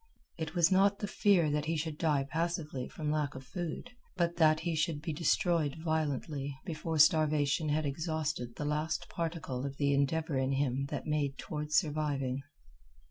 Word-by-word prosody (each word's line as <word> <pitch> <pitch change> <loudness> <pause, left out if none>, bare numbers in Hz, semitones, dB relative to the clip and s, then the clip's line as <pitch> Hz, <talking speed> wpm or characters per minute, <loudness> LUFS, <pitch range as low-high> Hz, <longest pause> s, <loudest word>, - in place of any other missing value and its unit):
It 160 +2 -4
was 170 0 +4
not 200 +1 +4
the - - -3
fear 190 -6 +3
that 150 0 0
he 165 +1 0
should 155 0 -3
die 150 -4 +2
passively 155 -3 -2
from 150 -2 -3
lack 150 -2 -1
of 130 - -7
food, 175 - -5 0.3
but 170 -1 0
that 155 -1 +4
he 165 -1 -1
should 155 -1 0
be 160 +1 -4
destroyed 165 -1 +1
violently 150 -3 -2
before 160 -2 -3
starvation 155 -1 +4
had 155 +1 +1
exhausted 155 -4 -2
the 150 - -4
last 155 +3 -1
particle 160 -6 -3
of 140 0 -4
the 140 -1 +2
endeavor 140 +1 +1
in 130 +1 +1
him 135 0 0
that - - -4
made 145 -3 0
toward 150 0 -5
surviving. 145 -5 +1
155 Hz, 170 wpm, -32 LUFS, 140-165 Hz, 0.3 s, was